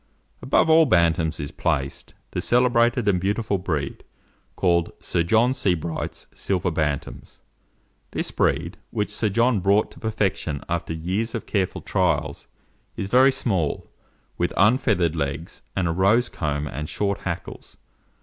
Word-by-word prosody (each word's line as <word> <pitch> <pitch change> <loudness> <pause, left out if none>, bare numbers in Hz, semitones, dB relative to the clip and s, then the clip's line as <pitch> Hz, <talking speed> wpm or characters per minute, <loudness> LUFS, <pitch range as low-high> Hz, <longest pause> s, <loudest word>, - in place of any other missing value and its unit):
Above - - +3
all 160 0 +6
Bantams 85 -5 +2
is 70 -1 -4
placed, 70 0 -2 0.2
the - - -2
celebrated 120 -1 +3
and 90 -3 +2
beautiful 100 0 0
breed 75 -7 -3 0.5
called 85 -2 +2
Sir 85 - -1
John 110 +9 +3
Sebright's 85 - -2
Silver 90 -2 -1
Bantams. 75 -3 -3 0.7
This - - -3
breed, 85 +6 0
which 105 -2 -2
Sir 110 - 0
John 115 +2 +2
brought 100 +3 +2
to - - -14
perfection 95 -9 -1
after 85 0 -2
years 95 +8 -2
of - - -4
careful 95 -3 -1
trials, 80 -6 -1 0.5
is 95 - -3
very 130 +3 +6
small, 95 - -1 0.5
with 85 - 0
un 110 +7 +5
feathered 90 - +1
legs, 75 +2 -4
and 95 -2 0
a - - +1
rose 100 +8 +3
comb 75 -3 -2
and 75 +3 -5
short 100 -1 -1
hackles. - - -6
95 Hz, 140 wpm, -24 LUFS, 80-110 Hz, 0.7 s, all